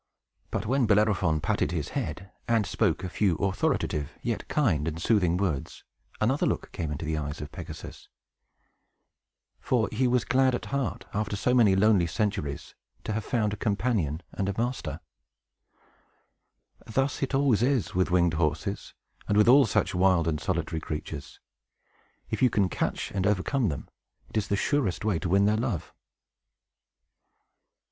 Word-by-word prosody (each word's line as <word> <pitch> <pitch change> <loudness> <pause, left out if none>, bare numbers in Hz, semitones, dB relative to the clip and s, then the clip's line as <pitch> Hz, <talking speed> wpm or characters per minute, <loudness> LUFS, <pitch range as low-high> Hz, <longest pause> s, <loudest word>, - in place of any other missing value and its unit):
But - - -3
when 130 +1 +2
Bellerophon 100 -7 +2
patted - - 0
his 80 -5 -2
head, 95 +2 -4 0.2
and 115 -3 +2
spoke - - 0
a - - -2
few 90 0 +1
authoritative, 80 -5 -1
yet - - -2
kind 85 - +1
and 80 0 -3
soothing 90 -3 +2
words, 90 -8 -2 0.4
another 130 +7 +2
look - - -2
came 80 -4 -4
into 75 +2 -4
the 80 0 -1
eyes 75 0 -5
of 75 - -7
Pegasus; - - -9 1.5
for 115 -5 +1
he 125 +4 +1
was 125 -1 +2
glad 130 -1 +3
at - - -5
heart, 135 -8 -2
after 105 0 -1
so 125 +5 +1
many 110 -6 +5
lonely 100 -3 +4
centuries, 100 -6 -2 0.3
to 110 - -3
have 110 0 -2
found 110 -5 0
a - - -4
companion 100 - -1
and 100 -1 -2
a 100 - -3
master. 120 +2 -2 1.9
Thus 135 +5 -1
it 135 0 0
always 135 -6 +3
is 130 -3 +1
with 95 0 +1
winged 85 -2 +3
horses, 80 +4 -2 0.3
and 105 - +2
with 105 - +5
all 135 +1 +7
such - - +1
wild 90 -2 +3
and 75 -2 -1
solitary 80 - -2
creatures. 75 -2 -6 0.9
If - - -2
you 130 - +6
can 100 -4 +1
catch - - -2
and 95 -1 0
overcome 105 +4 +1
them, 70 - -5 0.4
it - - -3
is 105 -1 0
the 100 - +1
surest 105 - 0
way 100 -6 +1
to 90 - -3
win 100 +2 +4
their 105 +1 +3
love. 110 -8 -3
100 Hz, 160 wpm, -27 LUFS, 85-115 Hz, 1.9 s, all